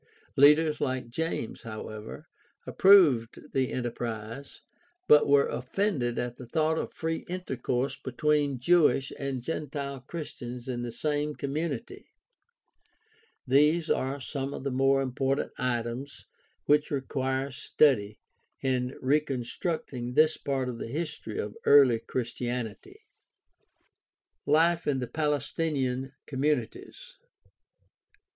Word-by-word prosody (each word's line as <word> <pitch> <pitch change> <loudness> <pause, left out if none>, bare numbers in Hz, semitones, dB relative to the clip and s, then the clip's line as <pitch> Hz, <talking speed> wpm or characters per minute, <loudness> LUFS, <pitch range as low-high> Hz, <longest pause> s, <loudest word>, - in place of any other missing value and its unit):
Leaders 150 +2 +5
like 130 -2 -2
James, 160 -5 -3
however, 110 -1 -8 0.4
approved 155 - +4
the 130 -1 +1
enterprise, 120 +1 -5 0.5
but 150 - +7
were 140 0 +5
offended 130 - -1
at 120 0 -3
the 125 - -10
thought 160 +5 +1
of - - -4
free 160 0 -3
intercourse 135 -7 -2
between 145 +1 +1
Jewish 145 -1 +3
and 135 -3 -3
gentile 140 -2 -4
Christians 125 -4 -7
in 120 -2 -3
the 120 -1 -4
same 150 +4 -1
community. 140 -1 -4 1.4
These 150 +5 +3
are 135 +2 0
some 135 0 -4
of - - -7
the 140 - -2
more 135 +1 +3
important 135 +1 -1
items 125 +2 -3 0.4
which 150 +1 +3
require 135 -1 -2
study 120 -5 +2 0.4
in 130 -1 -1
reconstructing 135 -2 -1
this 155 0 +5
part 135 -2 -2
of 120 -2 -5
the - - -5
history 150 -4 -4
of 105 0 -4
early 135 -5 +6
Christianity. 120 -2 -4 1.5
Life 165 +3 +3
in 145 -2 +2
the 125 - -2
Palestinian 140 -2 -1
communities. 140 -3 -3
135 Hz, 110 wpm, -28 LUFS, 125-150 Hz, 1.5 s, but